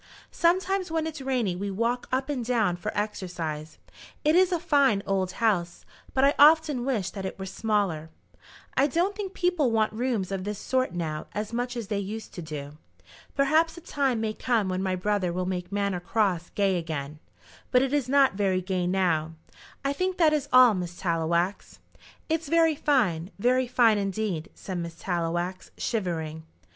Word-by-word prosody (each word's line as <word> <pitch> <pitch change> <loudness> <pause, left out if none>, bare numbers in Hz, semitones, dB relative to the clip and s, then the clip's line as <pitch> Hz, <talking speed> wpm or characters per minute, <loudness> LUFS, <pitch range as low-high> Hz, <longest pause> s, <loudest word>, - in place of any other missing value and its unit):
"Sometimes 370 +2 +1
when 320 -1 -1
it's 310 -3 -5
rainy 250 -8 0
we 200 +3 -3
walk 230 +5 -1
up 260 +1 0
and 280 -5 -2
down 225 -7 +1
for 175 - -4
exercise. 170 -7 -4 0.5
It 305 +2 +4
is 370 +1 +5
a 350 - +2
fine 275 - +3
old 190 -2 0
house, 185 -7 0 0.3
but 265 - +3
I 280 +1 +5
often 300 -4 +5
wish 225 -9 -1
that 195 - -6
it 190 - -5
were 190 - -5
smaller. 190 -6 -1 0.7
I 275 +2 +4
don't 350 +7 0
think 395 -2 -5
people 355 -7 +2
want 220 -1 +1
rooms 225 -5 -1
of 190 -1 -2
this 205 +1 -4
sort 255 -2 -1
now 155 -3 -3
as 210 +2 -3
much 245 +1 -2
as 225 -4 -5
they 205 -2 0
used 215 +3 -6
to 175 - -6
do. 150 -2 -7 0.6
Perhaps 315 +4 +2
a - - -9
time 275 -7 0
may 220 -1 -1
come 225 -4 0
when 185 0 -1
my 190 -1 0
brother 190 -1 0
will 180 +1 -2
make 180 0 -3
Manor 200 -2 0
Cross 180 -3 0
gay 195 -3 +2
again, 155 -2 -5 0.5
but 250 0 +4
it 270 +1 -1
is 280 -4 0
not 275 -3 +5
very 195 -2 +1
gay 185 -1 -1
now. 170 -4 +1 0.5
I 275 - +1
think 370 +4 -1
that 320 -3 +4
is 285 -2 -1
all, 255 -2 +8
Miss 180 -2 -4
Tallowax." 170 +2 -1 0.5
"It's 320 -1 -1
very 330 +1 +4
fine; 215 - +1
very 250 +4 +2
fine 230 -4 +4
indeed," 195 -4 -2
said 185 -2 -5
Miss 170 -1 -5
Tallowax, 175 +1 -2
shivering. 165 -8 -2
210 Hz, 180 wpm, -27 LUFS, 180-270 Hz, 0.7 s, all